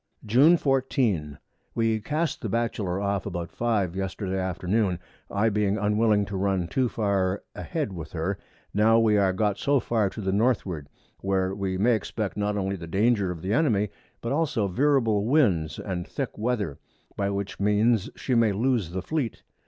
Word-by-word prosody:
June 135 +11 +6
14. 125 - 0 0.4
We 115 -1 +1
cast 150 +7 -2
the 110 - -3
Batchelor 105 -4 -1
off 100 -1 -1
about 85 -1 -4
5 105 -7 0
Yesterday 95 0 -3
Afternoon, 95 +1 0 0.3
I 105 +3 +2
being 105 -1 +1
unwilling 105 0 +2
to 100 -1 -4
run 95 -2 0
too 130 +4 +1
far 100 -3 0
a - - -7
head 150 - -3
with 80 -3 -8
her, 90 +4 -2 0.3
now 110 +2 +4
we 110 -2 +4
are 95 -1 +3
got 100 +1 0
so 140 -1 +3
far 110 -4 +1
to 110 - -9
the 95 -2 -1
Northward, 100 - 0 0.3
where 95 -1 0
we 95 -1 -2
may 115 +6 +3
expect 110 -1 -2
not 105 0 -1
only 95 0 -1
the 85 -1 -8
Danger 100 +2 +2
of 85 -3 -6
the 95 +3 -1
Enemy, 110 -9 +2 0.3
but 115 - -3
also 145 -8 +1
veerable 115 -1 +2
Winds 100 - +2
and 90 -3 -4
thick - - -4
Weather, 105 - -2 0.4
by 100 -1 0
which 100 0 -4
means 105 +2 +2
she 130 - -2
may 115 -3 +4
loose 115 -3 +1
the 90 +1 -4
Fleet. 135 0 -3
105 Hz, 175 wpm, -26 LUFS, 95-115 Hz, 0.4 s, June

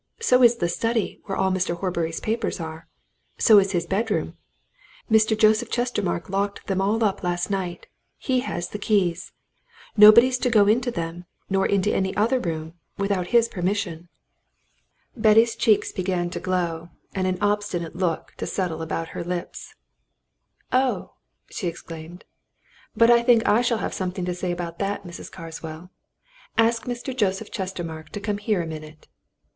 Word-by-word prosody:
So 255 - +4
is 240 -1 +7
the 175 -7 -1
study 225 +5 -1
where 195 - -3
all 190 0 +2
Mr. 185 -2 0
Horbury's 170 -3 -2
papers 225 -2 -2
are. 160 0 -7 0.5
So 215 -2 +7
is 195 0 0
his 170 -2 0
bedroom. 205 +4 -1 0.8
Mr. 220 0 +4
Joseph 220 +2 +3
Chestermarke 210 -8 -1
locked 200 +1 -2
them 190 -1 -1
all 215 +4 +1
up 205 -3 0
last 175 +1 -1
night 180 -3 -3 0.3
he 260 -2 0
has 175 -9 -4
the 210 - -6
keys. 190 -5 0 0.6
Nobody's 235 +4 +8
to 250 - +1
go 215 -3 +5
into 240 +5 +2
them 170 -4 -5 0.3
nor 195 0 +2
into 200 +1 +1
any 190 0 -1
other 235 +5 +2
room 160 -4 -4 0.2
without 200 -3 -1
his 235 +1 +4
permission." 180 -4 -3 1.1
Betty's 225 0 +4
cheeks 215 -3 +2
began 180 -2 -2
to - - -4
glow, 170 -2 -2 0.2
and 185 -1 -1
an 185 0 0
obstinate 205 -5 -1
look 175 -2 -2
to - - -4
settle 175 -4 -2
about 165 0 -3
her - - -5
lips. 175 0 -6 1.0
"Oh!" 255 0 0 0.4
she 185 - -3
exclaimed. 165 +1 -8 0.7
"But 230 +1 +6
I 235 0 +6
think 235 -2 +4
I 220 +3 +4
shall 235 -1 +1
have - - -3
something 185 -1 -3
to 180 - -1
say 175 0 -3
to 170 -1 -5
that, 200 0 -2
Mrs. 175 -2 -9
Carswell. 165 0 -9 0.7
Ask 230 0 +2
Mr. 245 +1 -4
Joseph 205 -2 -1
Chestermarke 170 -5 -5
to 205 - -4
come 205 0 -2
here 205 -4 0
a - - -5
minute." 155 -1 -9
195 Hz, 160 wpm, -24 LUFS, 175-220 Hz, 1.1 s, Nobody's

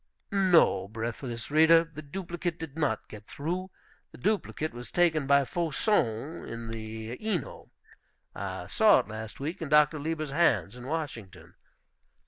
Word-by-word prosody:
No, 180 - +4
breathless 115 +3 -5
reader, 160 +2 +6
the 165 -2 -10
duplicate 170 +2 -4
did 160 -3 -7
not 145 -9 -1
get 105 -1 -12
through. 180 +6 -3 0.4
The - - -13
duplicate 190 -6 -1
was 120 +1 -8
taken 160 -5 +2
by 140 0 +5
Faucon, 155 - 0
in 115 0 -7
the 110 - -6
Ino. 215 -6 -3 0.6
I - - -5
saw - - +5
it - - -16
last 110 0 -7
week 160 +7 -4
in 160 - -4
Dr. 150 0 +5
Lieber's 155 -1 -3
hands, 115 - +2
in 125 +1 -9
Washington. 110 - -5
145 Hz, 140 wpm, -29 LUFS, 115-165 Hz, 0.6 s, reader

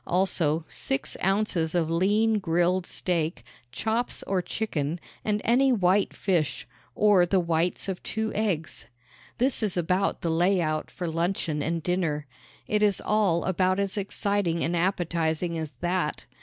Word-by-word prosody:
Also, 170 -4 +1
six 135 - -3
ounces 190 -4 +1
of 170 -2 +2
lean 210 +5 +2
grilled 175 0 +1
steak, 165 -7 -2 0.3
chops 225 +2 -1
or 190 -2 0
chicken, 170 -5 -2 0.2
and 210 -1 0
any 260 +4 +4
white 195 -3 +3
fish 155 -10 -1 0.3
or 205 -4 +5
the 185 +2 +2
whites 170 +1 0
of 190 -2 -3
two 220 0 -2
eggs. 170 - -2 0.5
This 255 +1 +2
is 205 -5 0
about 180 +3 0
the 165 - 0
layout 165 -2 +1
for 180 - -5
luncheon 165 -2 -1
and 165 +1 -2
dinner. 165 -5 -1 0.4
It 210 0 +1
is 205 -3 +3
all 200 -6 +1
about 185 +1 +1
as 200 -1 -1
exciting 200 -3 -1
and 170 - 0
appetizing 170 -2 0
as 160 -1 -4
that. 175 -3 -1
180 Hz, 145 wpm, -26 LUFS, 165-200 Hz, 0.5 s, or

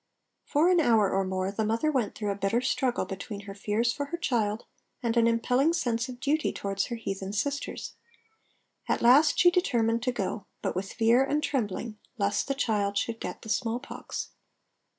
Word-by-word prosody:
For 300 +4 +3
an 355 - +4
hour 225 -9 +4
or 195 0 +1
more 185 0 -2
the 220 +2 -1
mother 230 +8 +1
went 255 -7 -1
through 210 -2 -2
a - - -2
bitter 200 +4 +1
struggle 255 -1 0
between 200 +1 -6
her 200 -1 -8
fears 210 +4 0
for 285 - -3
her 340 +4 -4
child 225 -9 -1 0.4
and 230 -1 0
an 230 -1 +4
impelling 250 +7 +2
sense 240 -5 -1
of 245 -1 -8
duty 295 +3 +1
towards 195 0 -2
her 240 - -4
heathen 195 -3 -5
sisters. 280 +7 -3 1.0
At - - +1
last 280 +6 +6
she 355 - +6
determined 235 -10 +1
to 250 +1 0
go, 205 -2 -3 0.2
but - - -1
with 190 +2 -3
fear 235 +3 +4
and 295 +2 0
trembling 220 -3 -2 0.2
lest 200 -1 0
the 275 - -1
child 205 -6 0
should 225 +2 -1
get - - -6
the 220 - -9
smallpox. 235 +4 -3
230 Hz, 185 wpm, -28 LUFS, 205-265 Hz, 1.0 s, last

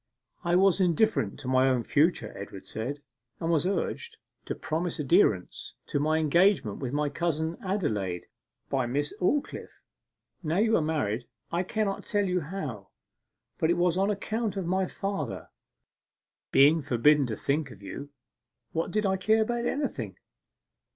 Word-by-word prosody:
'I 175 -1 +2
was 190 +1 +4
indifferent 180 - +2
to 130 - -7
my 130 +1 +4
own 125 -2 +1
future,' 155 +9 +1
Edward 100 -1 -8
said, 140 +6 -5 0.4
'and 165 0 -1
was 165 +1 +2
urged 445 - -2 0.3
to - - -3
promise 165 +2 -2
adherence 135 - +2
to 145 - -1
my 155 +2 +2
engagement 160 - +3
with 130 -3 -3
my 145 +1 0
cousin 160 +2 -1
Adelaide 110 - -1 0.4
by 130 -3 0
Miss 145 +4 -1
Aldclyffe: 280 +11 -1 0.6
now 165 0 -1
you 220 +2 +4
are - - +3
married 130 -7 -1 0.2
I 170 - +1
cannot 200 +1 -1
tell 205 -1 0
you 180 -1 +1
how, 145 - -6 0.7
but 160 - +2
it 175 - +3
was 175 -1 +2
on 195 +2 +2
account 210 0 -2
of 190 - -2
my 185 +2 +1
father. 195 - -4 1.0
Being 150 +4 +6
forbidden 140 +2 +4
to 110 - -3
think 140 +5 -1
of 105 -5 -13
you, 140 +9 -7 0.6
what 165 0 -1
did 215 0 0
I 190 -1 +2
care 220 +4 +3
about 240 +1 -1
anything? 125 - -3
160 Hz, 155 wpm, -28 LUFS, 135-190 Hz, 1.0 s, Being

